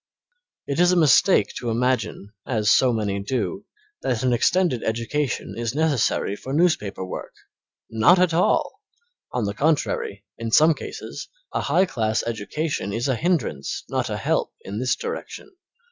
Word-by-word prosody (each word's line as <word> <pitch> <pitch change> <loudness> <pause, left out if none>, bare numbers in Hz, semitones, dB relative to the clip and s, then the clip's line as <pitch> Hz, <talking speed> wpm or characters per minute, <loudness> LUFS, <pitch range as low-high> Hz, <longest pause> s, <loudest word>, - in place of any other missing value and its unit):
It 140 +2 -2
is 175 0 +5
a - - +3
mistake 165 +3 +4
to 120 - -3
imagine, 115 -3 -1
as 105 -4 +2
so 130 +2 +5
many 105 -3 -1
do, 130 - -3 0.3
that 125 -1 -1
an 125 -1 +2
extended 165 0 +2
education 120 +5 -2
is 115 +1 -3
necessary 145 -9 +1
for 130 +5 -7
newspaper 140 - +1
work. 90 - -7 0.6
Not 115 +12 +5
at 180 -2 +3
all! 175 +3 +1 0.5
On 125 -3 -1
the 100 - -2
contrary, 135 -7 -1
in 115 0 -3
some 155 +8 +6
cases, - - -8 0.2
a - - 0
high 190 - +3
class 110 -9 -1
education 115 - -3
is 120 +5 -1
a 135 - +1
hindrance, 135 - -1
not - - -1
a - - -2
help - - 0
in 100 +2 -6
this 125 0 +1
direction. 405 - -6
125 Hz, 155 wpm, -23 LUFS, 110-155 Hz, 0.6 s, some